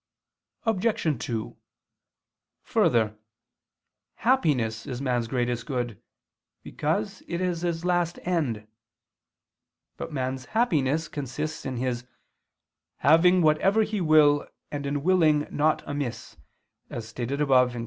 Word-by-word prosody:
Obj. 195 - 0
2: 115 -2 -4 1.1
Further, 110 -2 +2 1.0
happiness 135 - +1
is 125 -2 -4
man's 125 -4 0
greatest 120 -1 -1
good, 120 -5 -3 0.6
because 195 +6 -2
it 170 - -3
is 180 -2 -1
his 170 -1 -2
last 175 -1 +1
end. 145 -12 -1 1.3
But - - -6
man's 130 -1 -3
Happiness 160 - +2
consists 145 +2 -4
in 130 -2 -3
his 125 -1 -2 0.9
"having 175 +4 +5
whatever 190 +8 +4
he 215 -2 -2
will, 150 -3 +5 0.2
and 145 -1 -3
in 140 0 -2
willing 160 -5 +4
naught 155 +1 +1
amiss," 125 -5 -4 0.5
as 115 -2 -6
stated 125 +4 -4
above 130 -4 +4
(Q. 120 - -5
145 Hz, 110 wpm, -26 LUFS, 125-170 Hz, 1.3 s, having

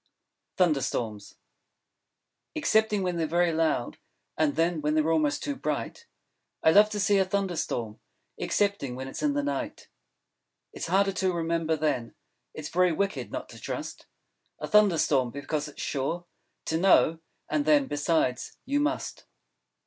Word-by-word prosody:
Thunder 160 -7 +3
Storms 105 -5 -4 1.2
Excepting 220 -2 +2
when 180 -2 -1
they're 165 -1 0
very 170 +1 +2
loud, 160 -6 0 0.4
And 155 -2 +1
then, 165 0 +1
when 150 +1 0
they're 155 +1 +2
almost 150 -3 +1
too 285 - -2
bright, 465 +10 -4 0.6
I 160 - +6
love 210 +4 +6
to 210 -1 -3
see 200 0 +3
a - - +5
Thunder 190 -1 -1
Storm, 115 -8 -3 0.4
Excepting 200 -11 0
when 130 +1 -6
it's 135 - -6
in 295 -1 +2
the 290 0 0
night. 290 - -4 0.8
It's - - -5
harder 195 +3 +3
to 190 0 0
remember, 165 -1 0
then: 145 -6 -1 0.4
_It's 150 -1 -5
Very 180 0 +3
Wicked 200 +5 -2
not - - -5
to - - -12
trust - - -6 0.5
A - - -5
Thunder 210 -5 +5
Storm. 130 -5 +2
Because 145 +3 -3
it's 150 - -13
Sure 160 +6 -2 0.4
To 160 - 0
know! 165 -3 +4 0.3
And 150 -1 0
then, 150 -2 +4
besides, 145 -3 -1
you 285 +3 +1
Must. 305 +2 -2
165 Hz, 155 wpm, -27 LUFS, 145-195 Hz, 1.2 s, I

